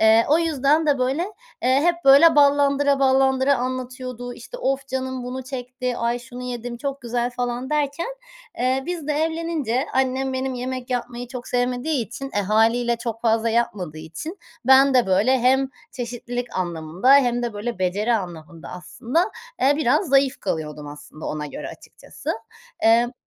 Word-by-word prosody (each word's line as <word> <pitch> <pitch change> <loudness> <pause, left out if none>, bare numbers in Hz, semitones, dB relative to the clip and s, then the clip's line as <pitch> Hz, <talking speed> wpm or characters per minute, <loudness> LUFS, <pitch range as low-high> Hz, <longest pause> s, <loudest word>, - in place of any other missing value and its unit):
Eee, 220 +1 +6
o 310 - +5
yüzden 310 -1 +2
de 285 -3 +3
böyle, 265 +6 0 0.4
eee, 260 +2 +3
hep 345 0 +3
böyle 295 +4 +7
ballandıra 285 0 +4
ballandıra 265 0 +3
anlatıyordu. 255 -1 -5
İşte, - - -10
"Of 270 - -1
canım 260 -1 -3
bunu 255 +1 -5
çekti, 250 -1 -4
ay 235 +1 0
şunu 245 +1 -10
yedim 245 -1 -5
çok 275 +2 -4
güzel." 240 +1 -1
falan 245 +2 -3
derken, 300 +3 0 0.5
eee, 260 +2 +1
biz 345 -4 -4
de 300 - 0
evlenince 315 -5 -1
annem 265 0 0
benim 260 0 -2
yemek 255 0 -5
yapmayı 245 0 -3
çok 250 -1 -7
sevmediği 250 +1 0
için, 270 +4 -7
e, - - +3
hâliyle 230 +4 +2
çok 230 -1 -5
fazla 225 0 +2
yapmadığı 195 -9 -1
için 165 - -7 0.3
ben 265 +1 +6
de 250 -5 +4
böyle 210 +8 +3
hem 265 +2 +3 0.2
çeşitlilik 245 0 -5
anlamında 175 - +2
hem 245 -3 +3
de 235 -2 -2
böyle 210 +1 -4
beceri 205 +6 +1
anlamında 170 -4 -6
aslında, 260 - -2 0.3
eee, 280 +2 +5
biraz 300 +4 +2
zayıf 275 0 +3
kalıyordum 150 -2 -4
aslında 145 +1 -10
ona 150 0 -3
göre - - -7
açıkçası. - - -9 0.5
Emm. 235 +2 +4
250 Hz, 155 wpm, -23 LUFS, 235-275 Hz, 0.5 s, böyle